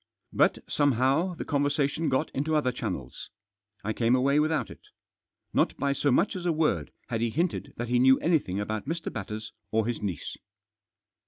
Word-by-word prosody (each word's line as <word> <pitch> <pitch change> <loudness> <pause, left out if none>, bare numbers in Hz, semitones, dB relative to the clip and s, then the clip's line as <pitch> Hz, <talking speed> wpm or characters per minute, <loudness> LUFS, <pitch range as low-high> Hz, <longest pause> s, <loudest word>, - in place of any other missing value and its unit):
But, - - +3
somehow, 145 +6 +2
the - - -5
conver 145 -1 +1
sation 145 +2 0
got 130 - 0
into 155 +3 -1
other 145 -4 +2
channels. 90 - -5 0.5
I 110 +2 -1
came 115 +2 +3
away 140 +3 +3
without 155 +1 0
it. - - -11 0.7
Not - - +2
by 140 0 +1
so 145 - +1
much 195 - +2
as 180 -1 -3
a - - +3
word 150 - 0 0.2
had 115 - -1
he 115 - +1
hinted 165 +9 -2
that 120 0 -4
he 120 0 +3
knew 130 +1 +6
anything 140 - +1
about 110 +3 -3
Mr. 165 +1 -3
Batters 105 +1 -5 0.2
or 110 -1 +1
his 120 0 -2
niece. 95 -5 -4
130 Hz, 180 wpm, -28 LUFS, 110-155 Hz, 0.7 s, knew